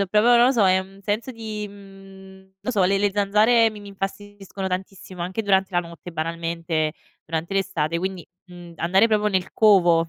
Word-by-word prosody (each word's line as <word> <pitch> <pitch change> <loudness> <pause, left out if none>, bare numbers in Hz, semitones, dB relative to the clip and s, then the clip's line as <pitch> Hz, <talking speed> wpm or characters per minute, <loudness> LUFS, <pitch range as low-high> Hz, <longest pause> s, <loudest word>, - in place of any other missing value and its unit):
C'ho 200 - +1
proprio 215 +2 +3
non 240 +1 +6
lo 265 - +4
so, 220 -6 +3
è 185 0 +4
un 195 +1 -9
senso 215 +6 -2
di, 215 -2 -6
mhmm, 195 -1 -15
non 255 - -3
so 200 -4 +2
le 195 +1 +2
le 205 - +2
le - - 0
zanzare 215 +3 +3
mi 210 -1 -11
mi 205 - -11
infastidiscono 195 0 -6
tantissimo, 185 -1 -6
anche 185 +5 -3
durante 195 -1 +2
la 175 - +2
notte, 170 0 -11
banalmente, 165 -1 -2 0.3
durante 165 +4 -4
l'estate. 170 -4 -1
Quindi, 185 -1 -4 0.2
mhmm, 175 -1 -12
andare 190 +7 +3
proprio 210 -1 +1
nel 190 -3 -1
covo 175 -6 +4
195 Hz, 195 wpm, -23 LUFS, 175-205 Hz, 0.3 s, non